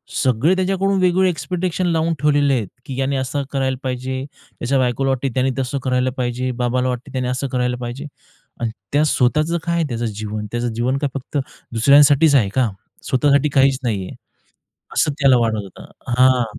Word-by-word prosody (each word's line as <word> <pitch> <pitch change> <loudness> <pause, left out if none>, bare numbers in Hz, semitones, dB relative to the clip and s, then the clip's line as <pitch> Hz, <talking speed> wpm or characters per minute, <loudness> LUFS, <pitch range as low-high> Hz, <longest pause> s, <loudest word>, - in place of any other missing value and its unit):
सगळे 135 +8 +2
त्याच्याकडून 195 +1 +1
वेगवेगळे 185 +1 +3
एक्सपेक्टेशन 180 +3 -2
लावून 165 0 +1
ठेवलेले 145 -2 +3
आहेत 110 -6 -1 0.2
की 135 -4 -6
याने 135 +1 0
असं 135 +2 -2
करायला 130 -2 -1
पाहिजे, 130 +1 -3 0.4
त्याच्या 135 +3 0
बायकोला 130 +2 +1
वाटते 135 +1 0
की 120 - -5
त्यांनी 130 0 +1
तसं 130 +1 -2
करायला 130 0 +1
पाहिजे, 125 +1 -1
बाबाला 125 +1 0
वाटतं 125 0 -5
त्याने 130 -1 -1
असं 130 +2 -2
करायला 125 -1 -1
पाहिजे 120 +5 -5 0.6
आणि 115 -1 -1 0.2
त्या 150 +1 +4
स्वतःचं 155 +5 +1
काय 170 0 -1
आहे 170 - +1
त्याचं 120 0 -2
जीवन? 105 0 -4
त्याचं 120 -1 -2
जीवन 125 +4 0
काय, 140 0 -1
फक्त 140 +2 -5 0.4
दुसऱ्यांसाठीचं 140 +4 +5
आहे 100 -6 +2
का? 130 -3 +2 0.4
स्वतःसाठी 140 +3 +3
काहीचं 135 -1 +3
नाहीये. 95 -4 -2 0.8
असं 150 - +2
त्याला 135 -2 +5
वाटत 110 -2 0
होतं. 95 - -13 0.2
हां. 130 0 +4
130 Hz, 175 wpm, -20 LUFS, 125-145 Hz, 0.8 s, दुसऱ्यांसाठीचं